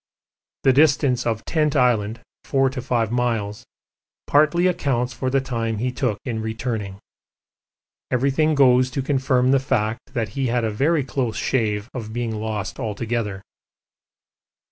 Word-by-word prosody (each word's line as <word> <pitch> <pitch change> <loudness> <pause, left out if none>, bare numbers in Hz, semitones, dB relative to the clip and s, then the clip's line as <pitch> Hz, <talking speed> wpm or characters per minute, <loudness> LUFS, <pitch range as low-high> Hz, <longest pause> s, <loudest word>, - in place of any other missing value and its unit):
The 135 - +5
distance 140 -4 +3
of 110 -1 -2
Tent 155 -3 +1
Island, 115 -4 +2 0.2
4 135 -1 +2
to 130 -1 -5
5 120 -3 0
miles, 115 -4 -1 0.6
partly 155 +4 +3
accounts 130 -8 0
for 130 +2 -2
the 135 +1 +2
time 115 -4 -2
he 125 +4 -1
took 125 -5 -1
in 115 -4 -3
returning. 110 -3 -4 1.1
Everything 140 +5 +2
goes 130 -2 +5
to 130 +1 -3
confirm 130 -2 +2
the 135 - +4
fact 110 -4 -2
that 115 -3 -1
he 135 +4 -2
had 120 0 0
a 110 - 0
very 145 +7 +1
close 130 -4 -2
shave 110 -3 0
of 110 -4 -6
being 120 -2 -2
lost 105 -1 -4
altogether. 110 -3 -3
125 Hz, 145 wpm, -22 LUFS, 110-135 Hz, 1.1 s, The